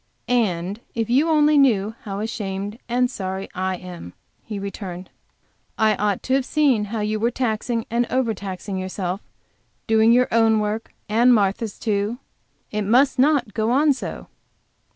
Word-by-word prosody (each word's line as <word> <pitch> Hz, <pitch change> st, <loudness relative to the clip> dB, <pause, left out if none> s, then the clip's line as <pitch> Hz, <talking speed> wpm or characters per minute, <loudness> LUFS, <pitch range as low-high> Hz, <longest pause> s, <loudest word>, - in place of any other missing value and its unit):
"And 200 Hz, -5 st, 0 dB, 0.2 s
if 230 Hz, 0 st, -1 dB
you 285 Hz, +6 st, +3 dB
only 300 Hz, -1 st, +4 dB
knew 220 Hz, -6 st, +3 dB
how 200 Hz, -1 st, -4 dB
ashamed 205 Hz, -1 st, -4 dB
and 250 Hz, +1 st, +2 dB
sorry 190 Hz, -5 st, -5 dB
I 185 Hz, 0 st, -1 dB
am!" 175 Hz, -, -9 dB, 0.3 s
he 215 Hz, -2 st, -6 dB
returned. 195 Hz, -2 st, -6 dB, 0.7 s
"I 220 Hz, -1 st, +4 dB
ought 205 Hz, -1 st, -1 dB
to 260 Hz, -, -1 dB
have 270 Hz, 0 st, +3 dB
seen 265 Hz, -7 st, +2 dB
how 215 Hz, +1 st, -3 dB
you 215 Hz, +2 st, 0 dB
taxing 230 Hz, -1 st, -2 dB
and 235 Hz, +1 st, +1 dB
over 250 Hz, -3 st, +1 dB
taxing 190 Hz, 0 st, -5 dB
yourself, 185 Hz, 0 st, -3 dB, 0.6 s
doing 220 Hz, 0 st, +4 dB
your 250 Hz, +1 st, +4 dB, 0.3 s
work 210 Hz, +1 st, -2 dB, 0.2 s
and 235 Hz, +4 st, +4 dB
Martha's 205 Hz, +1 st, 0 dB
too. 210 Hz, +1 st, -1 dB, 0.5 s
It 210 Hz, -, -1 dB
must 250 Hz, +7 st, +3 dB
not 265 Hz, -6 st, +3 dB
go 220 Hz, +1 st, 0 dB
on 285 Hz, +4 st, +4 dB
so." 260 Hz, -, -6 dB
220 Hz, 150 wpm, -22 LUFS, 195-245 Hz, 0.7 s, only